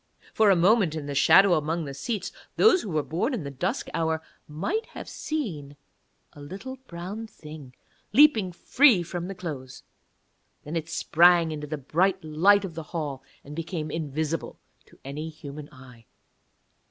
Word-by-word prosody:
For 220 -2 +4
a 195 - +6
moment, 180 -1 +3
in 155 -2 -5
the 145 - -4
shadow 175 +7 +6
among 160 +1 0
the 140 - -6
seats, 185 - -4 0.2
those 435 -4 +5
who 210 - -6
were 155 -3 0
born 220 - -1
in 195 - -4
the 140 - -6
dusk 180 - -2
hour 160 -1 0 0.3
might 260 - -3
have - - -9
seen 170 - -4 0.6
a 145 - -13
little 200 - -8
brown 185 +6 -6
thing 150 -9 -12 0.4
leaping 225 -7 +5
free 230 +2 +4
from 175 +1 -5
the 195 - -6
clothes, 140 -8 -7 0.8
then 150 +3 -6
it 165 0 -3
sprang 170 0 +4
into 150 -1 -5
the 155 +1 -4
bright 180 +7 0
light 190 +7 +4
of 180 - -7
the 165 - -5 0.2
hall, 145 -4 -4 0.2
and 145 +1 -10
became 165 -2 -4
invisible 155 +1 -3 0.3
to - - -20
any 150 +4 -5
human 150 -1 -9
eye. 125 -4 -16
165 Hz, 165 wpm, -26 LUFS, 150-195 Hz, 0.8 s, a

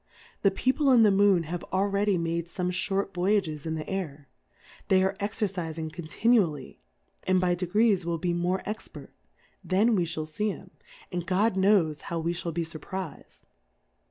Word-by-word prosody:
The 200 - +5
People 260 +8 +1
in 240 -3 +7
the 210 - +6
Moon 195 -3 +4
have 175 +2 -5
al 190 +1 +2
ready 200 -1 +1
made 170 0 -2
fome 180 +1 -3
fliort 195 +2 -1
Voyages 175 -5 0
in 160 - -2
the 155 - -4
Aiv, 155 -7 -4 0.6
they 190 -1 +4
are 190 +1 0
exercifing 180 -7 -3
continually, 170 - 0 0.5
and 185 0 +4
by 180 -1 +2
degrees 190 +3 +2
will 170 0 -1
be 175 +1 -1
more 175 +2 -1
expert, 215 +1 -7 0.5
then 210 +5 +3
we 180 -3 +1
fhall 155 -1 -4
fee 210 +6 -1
'em, - - -13 0.4
and 175 -1 -4
God 190 +3 +2
knows 190 -6 +3
how 170 - -2
we 165 +1 -1
fhall 175 0 -4
be 165 +1 -2
furpriz'd. 165 +1 -8
185 Hz, 165 wpm, -27 LUFS, 165-200 Hz, 0.6 s, in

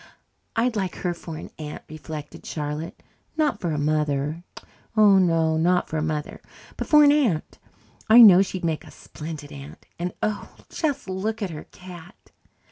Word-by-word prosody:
I'd 235 +1 +1
like 190 -4 -2
her 175 -1 -2
for 165 -2 -8
an - - -9
aunt, 150 -1 -7
reflected 155 -1 -8
Charlotte. 150 +2 -5 0.3
Not 295 -9 +1
for 175 - -1
a 150 - -1
mother 150 +1 -1 0.5
oh, 205 -2 +7
no, 165 -3 +2
not 180 +2 +2
for 160 - -3
a - - 0
mother, 155 -1 -3 0.3
but - - -5
for 300 -1 +7
an 290 - +7
aunt. 245 - 0 0.5
I 235 +2 +10
know 190 -4 +9
she'd 185 -2 -3
make 160 -2 -1
a - - -13
splendid 150 -2 -9
aunt. 140 -1 -11
And, 175 +1 -3
oh, 215 -1 -3
just 285 - -2
look 210 +4 -3
at 190 - -3
her 155 -1 -8
cat! 180 +1 -14
170 Hz, 170 wpm, -24 LUFS, 155-205 Hz, 0.5 s, I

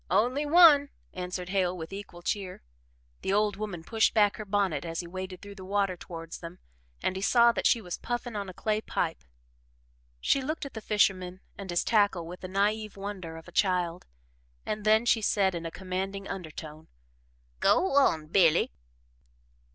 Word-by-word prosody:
"Only 245 +10 +2
one," 295 -3 +7 0.2
answered 180 0 -5
Hale 185 -2 +1
with 165 +2 -7
equal 195 -3 -9
cheer. 190 -2 -3 0.6
The - - -1
old 205 0 +2
woman 195 -5 -5
pushed 225 +6 +2
back 205 -2 +4
her 215 - -6
bonnet 195 -5 0
as 165 0 -3
he - - -10
waded 185 +1 -7
through 200 0 -9
the 195 -2 -11
water 195 -1 0
towards 165 -2 -8
them 170 +1 -9 0.5
and 185 - 0
he 190 - -4
saw 235 +3 +5
that - - +1
she 235 - +3
was 180 -4 -6
puffing 240 -1 -4
a 200 -2 -4
clay 215 +3 -1
pipe. 165 -6 -2 1.0
She 275 - +2
looked 305 +3 -3
at 280 - -8
the 220 - -6
fisherman 185 -4 +1 0.2
and 195 -1 -8
his 175 0 +1
tackle 205 -6 +2
with 175 +2 -8
the 185 - -7
naive 205 +2 0
wonder 195 -5 -6
of 165 - -12
a - - -11
child, 180 -2 0 0.6
and 210 0 -3
then 220 +2 +4
she 225 -1 +3
said 195 -2 +2
in 170 -1 -4
a - - -4
commanding 190 +2 -4
undertone. 155 -4 -7 0.7
"Go 380 - +3
on, 165 - +4
Billy." 165 0 +3
195 Hz, 175 wpm, -28 LUFS, 180-215 Hz, 1.0 s, one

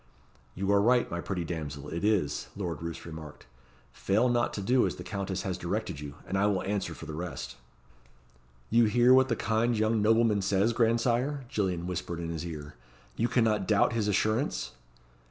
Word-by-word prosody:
"You 95 +2 0
are 100 0 +5
right, 120 +3 +3
my 85 0 -2
pretty 90 -2 -3
damsel, 75 -4 -5
it 85 +4 -4
is," 95 -9 +1
Lord 85 -6 -4
Roos 85 0 -6
remarked. 80 -2 -9 0.5
"Fail 110 +6 +1
not 120 0 +1
to 100 - -3
do 125 +5 +3
as - - -4
the - - -8
Countess 100 -2 -3
has 95 -2 -3
directed - - -3
you, 70 -1 -7
and 95 - -1
I 100 - +3
will 100 -3 0
answer 95 -4 -2
for - - -9
the 80 - -6
rest." 75 -6 -5 1.2
"You 115 +1 +5
hear 120 +3 +5
what 130 0 +5
the 115 - +2
kind 115 +1 +1
young 110 0 +2
nobleman 110 -1 +3
says, 100 +4 +2
grandsire?" 120 +4 +1
Gillian 90 -6 -1
whispered 90 -1 -4
in 85 -1 -4
his 85 +1 -4
ear. 75 -2 -7 0.4
"You 115 - +1
cannot 110 -5 +1
doubt 105 0 +3
his 110 -3 0
assurance?" 105 - 0
100 Hz, 185 wpm, -29 LUFS, 85-115 Hz, 1.2 s, are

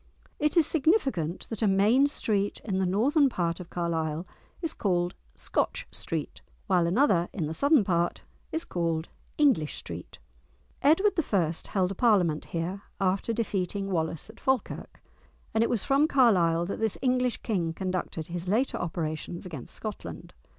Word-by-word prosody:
It 300 +3 +1
is 330 - +6
significant 270 - +1
that 225 - -4
a 220 - +3
main 210 +8 +4
street 205 -8 -1
in 190 -4 -1
the 190 - +1
northern 275 - +3
part 170 -6 -1
of 180 - -9
Carlisle 165 -1 -2 0.3
is 330 -3 -2
called 175 -3 0 0.2
"Scotch - - -1
Street," - - -4 0.2
while 175 -2 +3
another 185 -4 +3
in 170 - -2
the 155 - -3
southern 280 - +4
part 175 -2 0 0.3
is 325 +1 -2
called 165 -2 -1 0.3
"English 255 - +3
Street!" - - -8 0.6
Edward 355 +8 +4 0.2
I. 175 -6 +3 0.2
held 190 -2 +1
a - - -4
parliament 180 -9 +3
here 175 +4 -3 0.2
after 195 +3 +1
defeating 200 -3 -2
Wallace 160 -2 -1
at 220 - -14
Falkirk; 265 -4 -2 0.5
and 225 - +3
it - - +1
was 235 -5 +1
from 280 +2 +3
Carlisle 180 - +4
that 195 - -4
this 220 -2 0
English 250 -1 +1
King 180 -7 0
conducted 180 -2 -3
his 175 +1 -5
later 230 +8 +1
operations 165 0 -4
against 155 -9 -7
Scotland. - - -7
195 Hz, 155 wpm, -28 LUFS, 170-250 Hz, 0.6 s, is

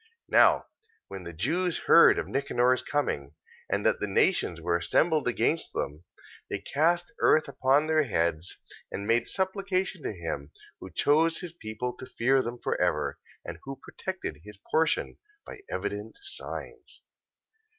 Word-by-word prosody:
14:15. 450 - -31 0.2
Now - - +5 0.4
when 95 -1 -7
the 85 - -6
Jews 165 - 0
heard 170 - +7
of - - -2
Nicanor's 130 -2 +1
coming, 70 - -2 0.3
and 100 +1 -1
that 110 - +3
the 105 - -2
nations 95 - +2
were 85 +1 0
assembled 155 - +2
against 125 +7 0
them, 75 +5 -4 0.4
they - - -1
cast 175 +8 0
earth 155 - +4
upon 140 +2 +2
their 155 0 +3
heads, 85 - -1 0.3
and 100 - -4
made 115 +2 +2
supplication 190 -2 -1
to - - -3
him 80 -7 -5 0.3
who - - -9
chose 160 +3 +3
his 180 -3 -5
people 125 -3 -5
to 130 - -9
keep 130 +1 +2
them 120 +1 -5
for - - -2
ever, - - 0 0.3
and - - -7
who 135 0 -7
protected 190 - -6
his 105 0 -12
portion 160 0 +1 0.3
by - - -9
evident 105 +2 -4
signs. 405 +1 -8
130 Hz, 150 wpm, -28 LUFS, 100-165 Hz, 0.4 s, heard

